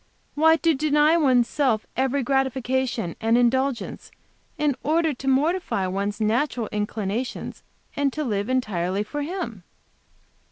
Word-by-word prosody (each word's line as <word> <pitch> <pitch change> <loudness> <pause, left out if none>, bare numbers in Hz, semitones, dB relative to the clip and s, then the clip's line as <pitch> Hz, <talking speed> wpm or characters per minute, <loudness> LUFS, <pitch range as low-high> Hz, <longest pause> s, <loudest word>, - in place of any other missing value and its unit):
"Why, 320 +2 +5
to 330 0 +2
deny 300 +2 +3
one's 255 -7 +3
self 250 -7 0
every 265 +1 0
gratification 260 - -1
and 225 +1 +3
indulgence 255 +1 0 0.5
in 295 -3 +1
order 320 +1 +1
to 265 +1 -8
mortify 285 - +1
one's 200 +3 -2
natural 230 +2 0
inclinations, 210 +3 -3 0.3
and 285 -1 +1
to 305 - -2
live 205 -4 -2
entirely 200 -6 0
for 290 +7 -5
Him." 295 - -4
260 Hz, 125 wpm, -24 LUFS, 220-295 Hz, 0.5 s, Why